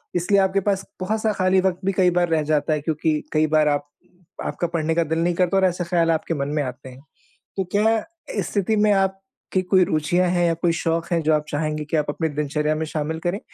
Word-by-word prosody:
इसलिए 190 +3 +2
आपके 190 +1 +2
पास 195 -1 -1 0.2
बहुत-सा 215 +3 0
खाली 185 -1 +2
वक़्त 185 -1 0
भी 195 - +2
कई 185 -2 +5
बार 175 -1 +1
रह 160 -2 +1
जाता 150 0 +2
है 150 - -1
क्योंकि 155 0 0
कई 155 0 +3
बार 155 0 +3
आप 145 -1 0 0.6
आपका 175 - -2
पढ़ने 165 -1 -1
का 170 - +3
दिल 160 +1 -2
नहीं 175 +1 +1
करता 180 +2 +2
और 190 - +4
ऐसे 180 -1 0
ख़्याल 170 -1 +1
आपके 165 +1 -1
मन 140 -3 -2
में - - +2
आते 130 0 -7
हैं। 130 +1 -13 0.6
तो 190 - 0
क्या 220 +2 +3 0.4
इस - - -2
स्थिति 205 +2 0
में 210 0 +3
आपकी 195 -1 -2
कोई 185 0 +4
रुचियाँ 175 +3 +1
हैं 175 -1 +2
या 165 - +2
कोई 170 +1 0
शौक 165 0 -1
हैं, 170 - +2
जो 155 0 +3
आप 150 0 0
चाहेंगे 150 0 -2
कि 155 +2 -2
आप 150 -1 +1
अपनी 160 +2 -1
दिनचर्या 150 +1 -1
में 160 +1 -3
शामिल 155 +1 -3
करें 180 +4 -1
165 Hz, 235 wpm, -22 LUFS, 155-185 Hz, 0.6 s, कई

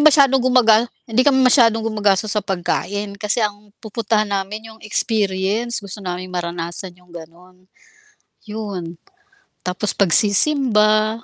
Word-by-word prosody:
masyadong 280 -3 +5
gumaga 240 -3 +3 0.2
hindi 225 +1 0
kami 270 -2 +4
masyadong 230 -3 +4
gumagastos 210 -2 0
sa 210 - 0
pagkain 200 +2 -3
kasi 210 +3 0
ang 205 0 -6
pupuntahan 215 -1 -2
namin 205 +3 -5
yung 220 - -20
experience 210 +1 0
gusto 200 +1 -7
naming 185 -1 -6
maranasan 175 +1 -5
yung 180 0 -25
ganon 175 +2 -15 0.8
yun. 200 -6 -7 0.7
Tapos 185 +3 -2
pagsisimba, 215 - +3
210 Hz, 120 wpm, -19 LUFS, 185-225 Hz, 0.8 s, masyadong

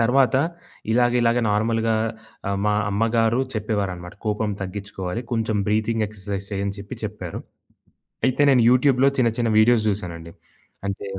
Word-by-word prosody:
తరువాత, 130 +3 +3 0.6
ఇలాగ 120 +1 +3
ఇలాగ 115 +1 +3
నార్మల్‌గా 115 +1 +1 0.5
ఆహ్, 100 0 -1
మా 105 - +3 0.2
అమ్మగారు 115 +3 +2
చెప్పేవారనమాట. 100 -5 -3
"కోపం 105 0 0
తగ్గిచ్చుకోవాలి. 95 +2 -5
కొంచెం 110 -2 0
బ్రీతింగ్ 110 +1 +1
ఎక్సర్సైజెస్ 100 -1 -6
చెయ్యు" 100 0 -1
అని 100 0 -3
చెప్పి 100 0 -8
చెప్పారు. - - -5 0.9
అయితే 130 +2 +1
నేను 125 -3 +5
యూట్యూబ్‌లో 130 +1 +4
చిన్న 120 -2 +3
చిన్న 115 -1 +1
వీడియోస్ 110 -1 +4
చూసానండి. 85 -5 -5 0.6
అంటే 100 +1 -4
110 Hz, 135 wpm, -23 LUFS, 100-115 Hz, 0.9 s, నేను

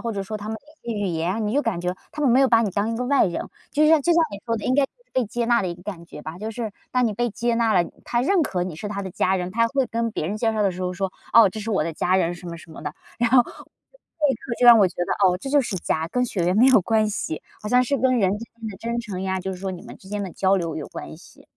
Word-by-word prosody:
或 235 - -3
者 200 - -3
说 215 +3 -5
他 210 0 -7
们 220 - -3 0.3
语 230 -3 -3
言， 180 +6 -1
你 210 - -1
就 290 - +3
感 195 -7 -1
觉 180 +1 -2 0.2
他 300 - -5
们 270 - +4
没 255 +3 +5
有 265 - +5
把 230 -1 +5
你 205 - 0
当 205 +4 -1
一 - - -2
个 250 - -2
外 280 -6 +4
人， 170 - -3 0.3
就 305 +1 +3
像 320 -1 +6
就 345 - +3
像 335 - +5
你 200 - -5
说 230 0 0
的 210 - -6
应 255 - +2
该 280 -1 +4 0.3
被 255 -2 +1
接 235 +2 -2
纳 235 -1 +4
的 185 - -1
一 170 - -4
个 175 - -16
感 175 -4 -7
觉 150 - -10
吧， 160 +3 -7
就 215 +2 -4
是 225 -1 -4 0.2
当 250 -1 +2
你 215 - -1
被 240 +3 0
接 235 +2 -1
纳 230 -2 +2
了， 175 -2 +3 0.2
他 240 0 0
认 370 +6 +3
可 180 -10 -1
你 180 -3 -4
是 205 +5 -5
他 200 -1 -4
的 190 - -5
家 190 +2 +1
人， 180 -1 -3
他 230 +4 +2
会 275 0 +1
跟 230 -1 -1
别 155 - -2
人 205 - -2
介 225 0 +1
绍 215 -1 0
的 195 - +3
时 180 +1 -7
候 180 0 -1
说， 190 0 -3 0.2
"哦， 230 -4 +8
这 215 - -6
是 225 +2 -4
我 175 -7 +1
的 165 - -3
家 185 +4 +1
人 175 -2 +1
什 175 0 -11
么 170 - -6
什 165 - -14
么 - - -10
的， 150 0 -5 0.2
然 240 - +2
后 250 -1 +7
立 305 - -5
刻 235 - -5
就 245 - +2
让 235 -1 +10
我 200 - +6
觉 - - -16
得 - - -1 0.2
哦 180 - +1
这 270 - -6
就 290 0 +5
是 230 -7 -3
家， 160 -1 -1
跟 250 +6 0
血 190 -7 -2
缘 180 +3 +2
没 245 - +6
有 260 -6 +6
关 215 +2 +2
系， 160 -6 -4 0.2
好 210 - -5
像 250 +2 +5
是 275 +2 0
跟 255 +1 +3
人 190 -3 +3
之 230 - -7 0.2
间 220 - -4
的 195 - -8
真 235 +2 -3
诚 205 -6 -6
呀， 190 -1 -1
就 190 - -4
是 180 - -8
说 190 0 -3
你 175 - -8
们 - - -11
之 190 - -16
间 205 0 -3
的 190 - -5
交 195 0 +2
流 165 -3 -2
有 - - -5
关 - - -8
系。 - - -18
215 Hz, 350 characters per minute, -23 LUFS, 185-240 Hz, 0.3 s, 让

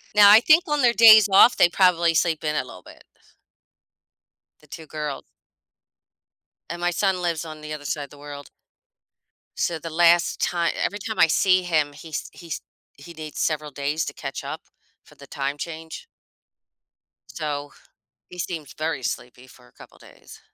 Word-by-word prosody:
Now, 205 -1 +8
I 215 - +9
think 310 +7 +4
on 295 -1 0
their 240 -1 +4
days 220 -2 +8
off, 215 +5 +6
they 175 - +5
probably 170 -3 +2
sleep 160 -1 0
in 150 0 -1
a - - 0
little 90 -7 -13
bit. - - -16 1.6
The 150 - -23
2 160 +1 -11
girls. 150 -3 -6 1.5
And 170 +1 -6
my 175 0 0
son 190 0 -1
lives 170 -2 -2
on 155 -1 -10
the 155 0 -7
other 145 -1 -8
side 145 +1 -3
of - - -20
the 145 - -16
world. 145 0 -10 1.1
So 165 -2 -1
the 165 - -7
last 170 +1 +3
ti 170 -1 0 0.2
every 205 - -4
time 220 +2 -6
I - - +6
see 185 +3 +2
him, 155 -4 0
he's 155 +1 -7
he's 170 -3 -8 0.3
he 170 +5 -13
needs 155 -1 -9
several 150 -2 -2
days 145 +3 -3
to - - -6
catch 135 0 -7
up 155 +3 -6 0.4
for - - -21
the - - -14
time 140 +1 -4
change 160 0 -8 1.2
so, 145 -2 -5 0.6
he 180 - -12
seems 160 -5 -6
very 155 -4 -4
sleepy 125 +1 -6
for 125 -1 -19
a - - -24
couple - - -17
of - - -22
days. - - -16
160 Hz, 175 wpm, -23 LUFS, 145-175 Hz, 1.6 s, I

